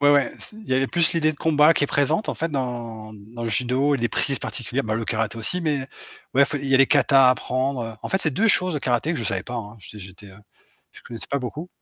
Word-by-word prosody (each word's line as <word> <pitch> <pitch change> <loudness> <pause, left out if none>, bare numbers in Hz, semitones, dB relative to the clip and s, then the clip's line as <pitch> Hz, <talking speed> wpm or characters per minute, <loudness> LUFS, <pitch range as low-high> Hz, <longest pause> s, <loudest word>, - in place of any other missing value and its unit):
Ouais, 145 0 +5
ouais, 140 -1 +2
c - - -9
il 220 - -14
y 130 - +1
avait 135 +1 +1
plus 170 +3 +3
l'idée 155 -2 +1
de - - -14
combat 150 0 +4
qui - - +1
est - - -1
présente 150 +9 0
en - - -1
fait, 165 +1 -3
dans 120 -5 -5
dans 110 +4 -11
le - - -2
judo 130 +6 +1
et - - -1
les 120 0 0
prises 135 +3 +2
particulières, 125 +3 -3
bah, 110 0 -2
le 115 +1 -2
karaté 110 -1 -2
aussi, 180 +11 0
mais 145 -5 -1 0.5
bref 140 +3 +3
il 140 - -5
y 135 - +2
a - - +5
les 135 - +6
kata 135 -2 +5
à - - +6
apprendre, 130 +1 -1
heu, 115 - -6
en - - -5
fait 190 - 0
c'est 160 - +1
2 225 +12 +2
choses, 185 -4 +3
le 145 - -2
karaté 130 +5 0
que 165 - -3
je 115 - -3
savais 95 -1 -1
pas, 125 - -8
hein, 110 -2 -7
j'étais 105 +2 -10
j'étais, 95 +2 -13
heu, 95 0 -15 0.5
je - - -15
connaissais 115 -1 -6
pas 140 - -1
beaucoup. 145 +7 -7
130 Hz, 285 wpm, -22 LUFS, 115-150 Hz, 0.5 s, les